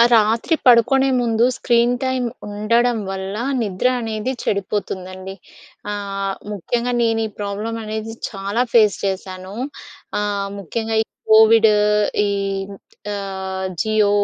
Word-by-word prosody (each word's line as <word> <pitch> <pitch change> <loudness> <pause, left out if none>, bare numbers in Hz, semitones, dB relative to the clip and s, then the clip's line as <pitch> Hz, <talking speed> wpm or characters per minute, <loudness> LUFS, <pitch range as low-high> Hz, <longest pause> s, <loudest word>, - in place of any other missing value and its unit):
ఆహ్, 235 - +7
రాత్రి 225 +8 +2
పడుకునే 260 +3 +5
ముందు 230 -1 +2
స్క్రీన్ 240 0 +3
టైమ్ 260 -1 0 0.2
ఉండడం 230 +3 +1
వల్ల 195 +1 -4 0.3
నిద్ర 205 +4 0
అనేది 225 +2 -2
చెడిపోతుందండి. 190 -2 -3 0.6
ఆహ్, 195 -1 -3 0.2
ముఖ్యంగా 240 +5 -1
నేనీ 225 -1 +1
ప్రాబ్లమనేది 220 +2 -4 0.2
చాలా 200 +4 -1
ఫేస్ 215 -4 +5
చేశాను. 190 0 -5 0.7
ఆహ్, 200 -1 -1
ముఖ్యంగా 220 +4 -3
ఈ - - -7 0.3
కోవిడు, 220 0 +7 0.5
ఈ - - 0 0.8
ఆహ్, 190 -1 -4
జియో 215 -1 +2
215 Hz, 105 wpm, -20 LUFS, 195-230 Hz, 0.8 s, ఆహ్